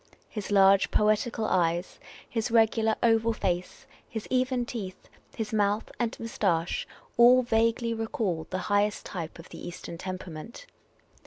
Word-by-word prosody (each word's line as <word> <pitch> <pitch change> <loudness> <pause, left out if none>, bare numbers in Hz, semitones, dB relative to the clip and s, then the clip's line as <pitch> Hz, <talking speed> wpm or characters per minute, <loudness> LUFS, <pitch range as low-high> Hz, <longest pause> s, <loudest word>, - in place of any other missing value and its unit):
His 210 -3 -5
large, 195 -1 +5
poetical 215 +2 +1
eyes, 175 -2 0 0.3
his 225 0 -2
regular, 225 -1 +3
oval 225 0 +3
face, 180 -4 -3 0.2
his 220 -2 -5
even 255 -1 +1
teeth, 205 -6 -7 0.3
his 220 -1 -4
mouth 210 0 +1
and 235 -2 -1
moustache, 185 -7 -1 0.3
all 250 +2 +7
vaguely 230 0 +1
recalled 220 - -2
the 185 - -2
highest 205 0 +1
type 165 -4 -6
of 165 - -12
the - - -10
Eastern 170 -1 -7
temperament. 185 - -7
215 Hz, 135 wpm, -28 LUFS, 185-230 Hz, 0.3 s, all